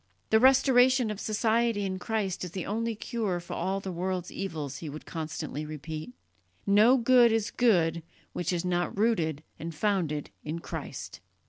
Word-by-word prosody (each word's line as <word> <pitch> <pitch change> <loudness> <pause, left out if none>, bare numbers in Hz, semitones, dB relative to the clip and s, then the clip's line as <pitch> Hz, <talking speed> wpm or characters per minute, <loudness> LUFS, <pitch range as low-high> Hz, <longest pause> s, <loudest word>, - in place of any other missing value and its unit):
"The 220 - +6
restoration 255 -2 +5
of 205 - -6
society 225 0 +1
in 185 -1 -3
Christ 200 -3 -2
is 180 - -4
the 185 - -4
only 230 +2 -2
cure 210 -5 -2
for 175 - -8
all 190 +1 -1
the 195 -1 -5
world's 180 0 -3
evils," 160 -8 -4
he 160 - -6
would 150 +2 -8
constantly 155 -2 -5
repeat. 155 -1 -6 0.5
"No 215 +6 +6
good 240 -1 +5
is 225 -2 0
good 170 -9 +2 0.3
which 175 0 -2
is 175 0 -1
not 175 +1 -1
rooted 165 -9 +1 0.2
and 165 +1 -6
founded 160 -5 -1
in 155 +2 -4
Christ." 170 - -7
190 Hz, 160 wpm, -28 LUFS, 165-225 Hz, 0.5 s, The